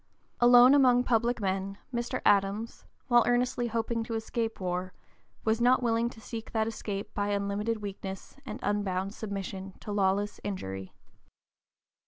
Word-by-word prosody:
Alone 245 +2 +8
among 250 -3 +5
public 240 0 +1
men 195 0 -2 0.2
Mr. 240 0 -2
Adams, 205 +3 +1 0.2
while 240 -1 +5
earnestly 245 0 +1
hoping 230 0 -1
to 230 0 -4
escape 225 0 -3
war, 180 0 -3 0.5
was 220 +1 +2
not 250 +1 +4
willing 230 0 +1
to 225 - -13
seek 225 0 -7
that 220 -1 +2
escape 205 -3 -5
by 205 0 -1
unlimited 205 +2 -1
weakness 195 -1 -7
and - - -7
unbounded 200 -1 -1
submission 195 -3 -6
to 210 - -7
lawless 205 0 +1
injury. 95 - -5
215 Hz, 140 wpm, -29 LUFS, 195-235 Hz, 0.5 s, Alone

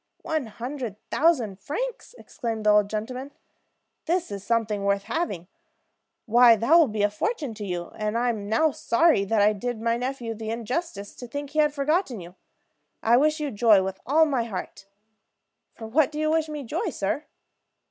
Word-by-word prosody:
"One 310 -6 -2
hundred 240 0 -6 0.2
thousand 250 - +2
francs!" - - -5
exclaimed 225 -2 -5
the 210 - +6
old 210 -1 +4
gentleman. 255 +6 -5 0.7
"That 350 - 0
is 200 -1 -6
something 215 -3 0
worth 200 0 +1
having. 200 - -3 0.8
Why, 240 0 +7
that 230 +8 +1
will 335 -3 +7
be 210 -2 -2
a 205 - +4
fortune 285 - -2
to 215 - -8
you; 175 -3 -4
and 215 +1 -2
I 245 +1 +1
am 205 -3 -3
now 305 +8 +3
sorry 275 -2 +3
that 210 0 +2
I 210 +1 +4
did 230 +3 -4
my 230 +1 0
nephew 250 -2 -3
the 220 0 -6
injustice 230 - -4
to 245 - -8
think 285 +3 -6
he 310 - -1
had 300 -1 +4
forgotten 290 - 0
you. 175 0 -10 0.7
I 230 +2 +5
wish 305 +4 +2
you 295 -2 -2
joy 210 -2 +5
with 190 0 -4
all 315 +4 +5
my 265 -6 0
heart!" 195 -2 -7 0.9
"For 225 - -9
what 275 +6 +2
do 300 - -7
you 310 0 +1
wish 320 -1 +1
me 300 -2 -5
joy, 230 - -2
sir?" 205 +10 -2
235 Hz, 185 wpm, -25 LUFS, 210-295 Hz, 0.9 s, Why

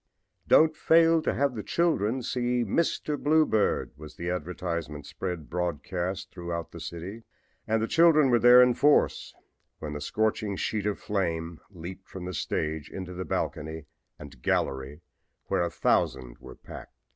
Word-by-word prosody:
"Don't 155 0 +5
fail 165 +1 +4
to - - 0
have 140 -1 0
the 110 - -4
children 130 - 0
see 125 0 0
'Mr. 150 +4 -1
Bluebeard,'" 150 -8 +2
was 75 +1 -11
the 85 +1 -3
advertisement 85 -3 -4
spread 90 -1 -5
broadcast 90 +2 -3
throughout 85 -2 -5
the 85 - -9
city, 85 +7 -7 0.5
and 110 0 +1
the - - 0
children 155 -4 +5
were 120 - +4
there 125 +1 +8
in 125 0 +3
force 145 +4 +2 0.4
when 75 -1 -6
the 75 - -5
scorching 110 +4 -1
sheet 105 +1 -2
of 105 - -1
flame 85 -5 -2
leaped 95 0 -9
from 95 -2 -7
the 90 - -5
stage 80 -1 -3
into 95 -1 -7
the 90 +1 -5
balcony 80 +1 -3 0.3
and 70 -4 -12
gallery 65 +3 -1 0.5
where - - +1
a 85 - 0
thousand 65 -6 0
were 65 0 -11
packed. - - -12
90 Hz, 155 wpm, -27 LUFS, 80-120 Hz, 0.5 s, there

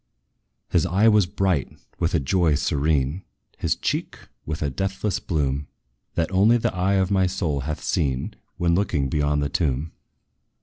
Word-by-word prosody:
His 85 0 +2
eye 95 +5 +3
was 105 -4 +5
bright 95 -6 -1 0.2
with 85 +2 +1
a - - +3
joy 80 +2 +2
serene, 70 +2 0 0.4
His - - +1
cheek - - -2 0.3
with 75 0 -3
a 70 - -1
deathless 95 +5 -2
bloom, 70 -3 -1 0.5
That 80 - 0
only 105 +5 +5
the 115 - -1
eye 95 +2 +1
of 95 0 +1
my 95 -2 +3
soul 85 -6 -1
hath 75 +3 -4
seen, 65 -3 -1 0.2
When 85 -1 +2
looking 85 -7 +1
beyond 75 0 +1
the 70 - -1
tomb. 75 -1 -1
80 Hz, 160 wpm, -24 LUFS, 70-95 Hz, 0.5 s, was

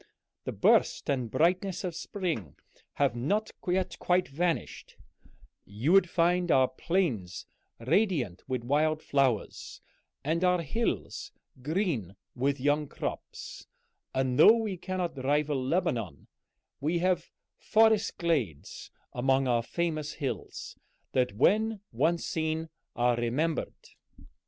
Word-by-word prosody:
The - - -2
burst - - +3
and 130 -4 -1
brightness 180 - +1
of 180 -2 -3
spring 165 - -4 0.4
have 140 -4 +1
not 205 - 0 0.2
yet 185 +1 0
quite 180 +1 +2
vanished; 170 +4 -3 0.7
you 110 +10 -2
would 195 -2 +5
find 175 +1 +2
our 130 -3 +5
plains 130 - -2 0.3
radiant 135 - +1
with 130 -2 -2
wild 155 +4 +2
flowers, 135 -6 0 0.4
and 165 +5 0
our 180 -1 +3
hills 225 +10 -2 0.3
green 145 - -1 0.2
with 140 +2 0
young 145 +2 +1
crops, - - -6 0.4
and 130 -1 0
though 225 - +9
we 215 -4 -2
cannot 175 -6 -4
rival 145 -1 +1
Lebanon, 125 - -1 0.5
we 155 +5 0
have 175 -1 0 0.3
forest 220 -1 +3
glades 135 - -2 0.2
among 135 +2 +2
our 120 -1 +2
famous 155 +2 -2
hills 125 -8 -5 0.3
that 125 -4 +1
when 215 - +3
once 170 +1 +1
seen 160 0 -2 0.3
are 120 0 +2
remembered." 135 +8 -1
155 Hz, 115 wpm, -29 LUFS, 130-180 Hz, 0.7 s, though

